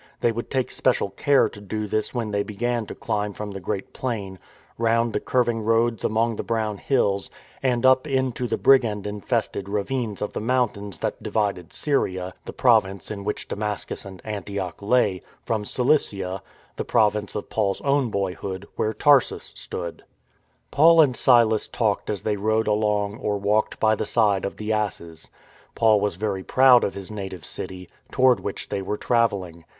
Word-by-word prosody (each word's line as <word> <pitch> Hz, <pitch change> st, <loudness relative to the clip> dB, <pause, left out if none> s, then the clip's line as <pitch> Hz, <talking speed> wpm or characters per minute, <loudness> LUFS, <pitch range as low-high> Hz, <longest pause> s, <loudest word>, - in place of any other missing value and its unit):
They 120 Hz, -, +3 dB
would 115 Hz, +1 st, -5 dB
take 130 Hz, -2 st, -1 dB
special 125 Hz, -6 st, +1 dB
care 140 Hz, +7 st, +3 dB
to 105 Hz, -, -11 dB
do 105 Hz, +2 st, -4 dB
this 110 Hz, +1 st, -1 dB
when 115 Hz, -4 st, -3 dB
they 100 Hz, 0 st, +1 dB
began 115 Hz, +2 st, -2 dB
to -, -, -7 dB
climb 105 Hz, 0 st, -2 dB
from 105 Hz, 0 st, -6 dB
the 95 Hz, -, -6 dB
great 95 Hz, +1 st, -4 dB
plain, 100 Hz, -7 st, -4 dB, 0.4 s
round 115 Hz, 0 st, +2 dB
the -, -, 0 dB
curving 120 Hz, -3 st, 0 dB
roads 115 Hz, +1 st, +1 dB
among 115 Hz, 0 st, +1 dB
the -, -, -3 dB
brown 110 Hz, -3 st, -2 dB
hills, 100 Hz, -7 st, 0 dB, 0.3 s
and 125 Hz, -2 st, +1 dB
up 130 Hz, +2 st, +5 dB
into 130 Hz, -3 st, -1 dB
the -, -, -1 dB
brigand 115 Hz, -7 st, +3 dB
infested 100 Hz, -1 st, -2 dB
ravines 105 Hz, +1 st, -2 dB
of 105 Hz, -, -4 dB
the -, -, -3 dB
mountains 110 Hz, -6 st, -1 dB
that -, -, -3 dB
divided 100 Hz, -5 st, -2 dB
Syria 95 Hz, -11 st, -1 dB
(the -, -, -6 dB
province 105 Hz, -7 st, +2 dB
in 100 Hz, -1 st, -5 dB
which 105 Hz, +1 st, -3 dB
Damascus 105 Hz, 0 st, -4 dB
and 95 Hz, -2 st, -11 dB
Antioch 100 Hz, -4 st, -5 dB
lay) 100 Hz, -4 st, +2 dB, 0.2 s
from 110 Hz, -2 st, -2 dB
Cilicia 100 Hz, -8 st, 0 dB, 0.4 s
(the -, -, -2 dB
province 105 Hz, -1 st, +1 dB
of 105 Hz, -, -5 dB
Paul's 100 Hz, -3 st, 0 dB
own 140 Hz, -3 st, +1 dB
boyhood, 95 Hz, -1 st, -3 dB
where 110 Hz, 0 st, 0 dB
Tarsus 145 Hz, -3 st, +3 dB
stood)/ 85 Hz, -1 st, -6 dB, 0.7 s
Paul 165 Hz, +3 st, +6 dB
and 140 Hz, -6 st, +5 dB
Silas 115 Hz, -4 st, +4 dB
talked 110 Hz, -4 st, -1 dB
as 105 Hz, -3 st, -3 dB
they 105 Hz, -1 st, 0 dB
rode 110 Hz, +2 st, +1 dB
along 105 Hz, 0 st, 0 dB
or 105 Hz, -1 st, -1 dB
walked 105 Hz, +2 st, 0 dB
by 110 Hz, 0 st, +4 dB
the 110 Hz, -, -2 dB
side 105 Hz, -4 st, +2 dB
of 100 Hz, -, -5 dB
the 110 Hz, +1 st, -2 dB
asses. 85 Hz, -6 st, -4 dB, 0.5 s
Paul 110 Hz, -3 st, +4 dB
was 105 Hz, -4 st, 0 dB
very 100 Hz, 0 st, -2 dB
proud 130 Hz, +1 st, +6 dB
of -, -, -1 dB
his 100 Hz, +1 st, -7 dB
native 95 Hz, -4 st, -6 dB
city, 90 Hz, -1 st, -6 dB, 0.2 s
toward 130 Hz, -4 st, +4 dB
which 95 Hz, +1 st, -6 dB
they 100 Hz, -, -2 dB
were 105 Hz, +2 st, -3 dB
travelling. 100 Hz, -9 st, 0 dB
105 Hz, 175 wpm, -24 LUFS, 100-120 Hz, 0.7 s, Paul